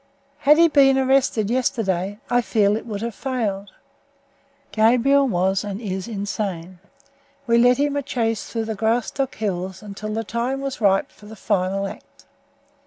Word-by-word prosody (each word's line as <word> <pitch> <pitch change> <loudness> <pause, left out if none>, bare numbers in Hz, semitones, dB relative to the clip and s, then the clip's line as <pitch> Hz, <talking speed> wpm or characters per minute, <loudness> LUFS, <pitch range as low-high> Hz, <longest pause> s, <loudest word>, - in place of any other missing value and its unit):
Had 295 +2 +5
he 335 0 +6
been 275 -3 +4
arrested 260 -5 +2
yesterday, 205 -7 -1
I 245 0 +2
feel 210 -3 +2
that 215 - 0
it - - -14
would 210 -1 -5
have 235 -1 -3
failed. 210 -6 -3 1.0
Gabriel 250 +5 +3
was 190 -2 0
and 205 -1 -5
is 190 -3 -4
insane. 195 -4 -4 0.7
We 235 -1 +3
led 245 +1 +5
him 285 0 0
a 285 - 0
chase 230 -5 -2
through 225 -1 -3
the 220 0 -4
Graustark 235 +5 -1
hills 190 -2 -4
until 210 +1 -7
the 225 +1 -2
time 235 +6 -2
was 275 -3 -5
ripe 195 -2 +2
for 210 - -17
the 220 - -10
final 195 -1 -1
act. 195 - -11
220 Hz, 165 wpm, -22 LUFS, 200-250 Hz, 1.0 s, he